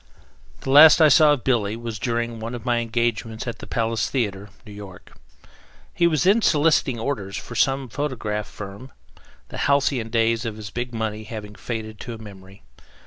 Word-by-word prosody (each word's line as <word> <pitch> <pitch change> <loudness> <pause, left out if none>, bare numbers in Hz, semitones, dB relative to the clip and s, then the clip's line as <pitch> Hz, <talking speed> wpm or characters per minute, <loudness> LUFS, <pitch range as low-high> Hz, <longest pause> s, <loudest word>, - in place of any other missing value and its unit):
The 135 - -3
last 150 +4 +9
I 155 -2 +7
saw 150 +1 +6
of 140 - -4
Billy 110 -5 +1
was 115 -2 -6
during 120 -1 -2
one 115 +2 -5
of 115 - -9
my 120 -1 +1
engagements 115 -1 -2
at 120 - -5
the - - -9
Palace 115 -1 -1
Theater, 105 -6 -2 0.2
New 105 - -11
York. 100 -3 -12 0.8
He 170 - +3
was 155 -2 +1
then 200 +5 +4
soliciting 150 - +2
orders 110 -6 -3
for - - -8
some 135 +3 +1
photograph 115 -6 -3
firm, 105 +6 -10 0.6
the - - -7
halcyon 135 -5 +1
days 115 0 +1
of 110 -3 -5
his 105 -2 -8
big 120 +2 -4
money 110 -2 -4
having 105 -2 -8
faded 110 -1 -6
to 120 -2 -7
a - - -9
memory. 100 -2 -13
115 Hz, 180 wpm, -23 LUFS, 110-130 Hz, 0.8 s, last